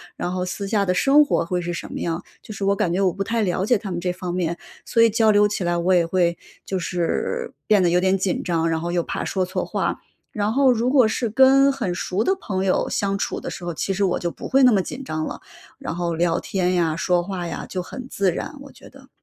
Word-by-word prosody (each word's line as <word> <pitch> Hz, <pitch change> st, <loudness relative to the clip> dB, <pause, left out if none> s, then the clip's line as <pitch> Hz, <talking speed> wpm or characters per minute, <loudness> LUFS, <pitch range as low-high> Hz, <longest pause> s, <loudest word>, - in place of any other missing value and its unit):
然 180 Hz, -, -3 dB
后 180 Hz, 0 st, -2 dB
私 195 Hz, +2 st, -4 dB
下 205 Hz, -2 st, +1 dB
的 180 Hz, -, +1 dB
生 285 Hz, +9 st, +5 dB
活 285 Hz, -, +1 dB
会 180 Hz, +1 st, -1 dB
是 175 Hz, 0 st, -3 dB
什 -, -, -6 dB
么 -, -, -5 dB
样？ 170 Hz, +1 st, -3 dB, 0.2 s
就 215 Hz, -, -9 dB
是 200 Hz, -, -6 dB
我 200 Hz, -, +3 dB
感 175 Hz, -3 st, 0 dB
觉 190 Hz, -, 0 dB
我 185 Hz, -2 st, +3 dB
不 200 Hz, -, -7 dB
太 230 Hz, +3 st, -1 dB
了 190 Hz, -1 st, 0 dB
解 245 Hz, 0 st, +3 dB
他 200 Hz, -1 st, -7 dB
们 175 Hz, -, -2 dB
这 180 Hz, 0 st, -2 dB
方 180 Hz, -1 st, -5 dB
面， 175 Hz, -2 st, -1 dB, 0.3 s
所 230 Hz, -, +2 dB
以 230 Hz, -, +6 dB
交 220 Hz, 0 st, +3 dB
流 205 Hz, 0 st, +5 dB
起 205 Hz, -, -2 dB
来 175 Hz, -, +1 dB
我 180 Hz, +2 st, +2 dB
也 175 Hz, -2 st, +4 dB
会 170 Hz, -1 st, +1 dB, 0.3 s
就 190 Hz, -, -2 dB
是 180 Hz, -, -2 dB, 0.2 s
变 210 Hz, -3 st, +4 dB
得 175 Hz, -, +3 dB
有 175 Hz, +1 st, +3 dB
点 190 Hz, +1 st, +2 dB
紧 190 Hz, -1 st, -1 dB
张， 165 Hz, -1 st, 0 dB
然 160 Hz, 0 st, 0 dB
后 170 Hz, +1 st, -3 dB
又 170 Hz, -1 st, +1 dB
怕 -, -, -4 dB
说 190 Hz, -2 st, -1 dB
错 185 Hz, -, -3 dB
话。 -, -, -2 dB, 0.3 s
然 210 Hz, +1 st, -1 dB
后 270 Hz, -1 st, +4 dB
如 240 Hz, +1 st, +1 dB
果 260 Hz, -3 st, +5 dB
是 235 Hz, 0 st, -1 dB
跟 265 Hz, +4 st, +5 dB
很 220 Hz, -10 st, -2 dB
熟 185 Hz, +3 st, -1 dB
的 385 Hz, -, +2 dB
朋 190 Hz, -, -2 dB
友 190 Hz, -, +1 dB
相 195 Hz, -1 st, -1 dB
处 -, -, -3 dB
的 -, -, -5 dB
时 175 Hz, -, -7 dB
候， 175 Hz, -, -3 dB
其 180 Hz, -, -2 dB
实 195 Hz, +1 st, +1 dB
我 180 Hz, -, 0 dB
就 175 Hz, -1 st, -3 dB
不 -, -, -8 dB
会 270 Hz, +1 st, +4 dB
那 250 Hz, -, +7 dB
么 195 Hz, -3 st, +3 dB
紧 265 Hz, +8 st, -7 dB
张 155 Hz, -9 st, -3 dB
了。 -, -, -6 dB, 0.4 s
然 -, -, -5 dB
后 170 Hz, -1 st, -2 dB
聊 170 Hz, 0 st, +1 dB
天 185 Hz, -2 st, -1 dB
呀、 165 Hz, -3 st, +1 dB
说 175 Hz, +1 st, +1 dB
话 180 Hz, -1 st, -5 dB
呀， -, -, -5 dB
就 185 Hz, -, -3 dB
很 255 Hz, +7 st, -8 dB
自 195 Hz, -7 st, 0 dB
然 290 Hz, -, -5 dB
我 280 Hz, -, -11 dB
觉 -, -, -16 dB
得。 -, -, -17 dB
185 Hz, 290 characters per minute, -22 LUFS, 175-220 Hz, 0.4 s, 那